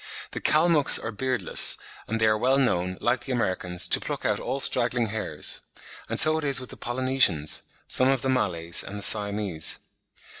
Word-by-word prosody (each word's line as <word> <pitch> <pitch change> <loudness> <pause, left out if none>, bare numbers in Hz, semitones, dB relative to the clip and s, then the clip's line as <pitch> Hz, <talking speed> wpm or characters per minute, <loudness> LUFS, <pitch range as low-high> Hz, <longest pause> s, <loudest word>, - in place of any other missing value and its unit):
The - - -7
Kalmucks 155 -2 +4
are 115 - -6
beardless, 130 +3 +2 0.3
and 115 +1 -3
they 110 - +1
are 110 0 +2
well 130 +5 0
known, 90 -9 -1
like 120 +1 -1
the 135 - -6
Americans, 95 -7 0
to - - +4
pluck - - -6
out - - -1
all 135 - -4
straggling 120 -3 0
hairs; 80 -8 -2 0.5
and - - 0
so 155 0 +6
it - - -8
is 140 -2 +3
with 130 - -9
the - - -8
Polynesians, 125 - 0 0.3
some 130 - +3
of 135 -2 0
the - - -1
Malays, 85 -10 0
and 105 - -9
the 100 - -6
Siamese. 100 -6 +1
115 Hz, 185 wpm, -24 LUFS, 95-130 Hz, 0.5 s, so